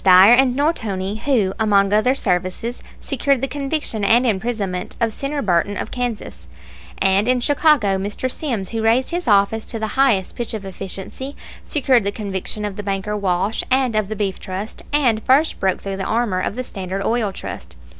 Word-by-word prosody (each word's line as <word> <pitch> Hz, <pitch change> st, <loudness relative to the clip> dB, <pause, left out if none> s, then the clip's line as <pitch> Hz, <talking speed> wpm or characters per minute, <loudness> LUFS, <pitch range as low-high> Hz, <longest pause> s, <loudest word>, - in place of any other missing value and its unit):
Dyer 190 Hz, +4 st, +8 dB
and 255 Hz, 0 st, +4 dB
Nortoni, 215 Hz, -, -1 dB
who, 220 Hz, -9 st, +2 dB
among 200 Hz, -2 st, +3 dB
other 250 Hz, +5 st, +3 dB
services, 185 Hz, +3 st, -2 dB, 0.2 s
secured 275 Hz, 0 st, 0 dB
the 270 Hz, -, -1 dB
conviction 275 Hz, -5 st, -2 dB
and 235 Hz, +5 st, +4 dB
imprisonment 200 Hz, -4 st, -2 dB
of 230 Hz, -2 st, 0 dB
Senator 280 Hz, +3 st, -3 dB
Burton, 195 Hz, +1 st, +1 dB
of -, -, -4 dB
Kansas; 245 Hz, -3 st, -4 dB, 0.5 s
and 195 Hz, +3 st, +2 dB
in 255 Hz, 0 st, +3 dB
Chicago 270 Hz, -, +3 dB
Mr. 205 Hz, +6 st, -3 dB
Sims, 245 Hz, -, -3 dB
who 225 Hz, -1 st, -3 dB
raised 230 Hz, +4 st, +2 dB
his 350 Hz, +1 st, -3 dB
office 205 Hz, +1 st, +3 dB
to 230 Hz, -, -5 dB
the 220 Hz, -1 st, -3 dB
highest 240 Hz, -9 st, +2 dB
pitch 235 Hz, -2 st, -3 dB
of 205 Hz, -2 st, -6 dB
efficiency, 195 Hz, +8 st, -6 dB, 0.3 s
secured 260 Hz, -5 st, +2 dB
the 200 Hz, -, 0 dB
conviction 205 Hz, 0 st, -3 dB
of 205 Hz, -2 st, -5 dB
the -, -, -3 dB
banker 200 Hz, +1 st, -2 dB
Walsh 195 Hz, +1 st, 0 dB
and 255 Hz, -3 st, +2 dB
of 215 Hz, -2 st, +1 dB
the 215 Hz, -, -4 dB
Beef 195 Hz, -2 st, -2 dB
Trust, 195 Hz, +3 st, -6 dB
and 250 Hz, -7 st, +2 dB
first 280 Hz, +7 st, +2 dB
broke 190 Hz, -1 st, +1 dB
through 195 Hz, -1 st, -5 dB
the 190 Hz, -, -3 dB
armor 220 Hz, -3 st, 0 dB
of 195 Hz, -, -2 dB
the 255 Hz, -, -3 dB
Standard 195 Hz, -3 st, -5 dB
Oil 225 Hz, -3 st, +1 dB
Trust. -, -, -8 dB
215 Hz, 185 wpm, -20 LUFS, 195-255 Hz, 0.5 s, Dyer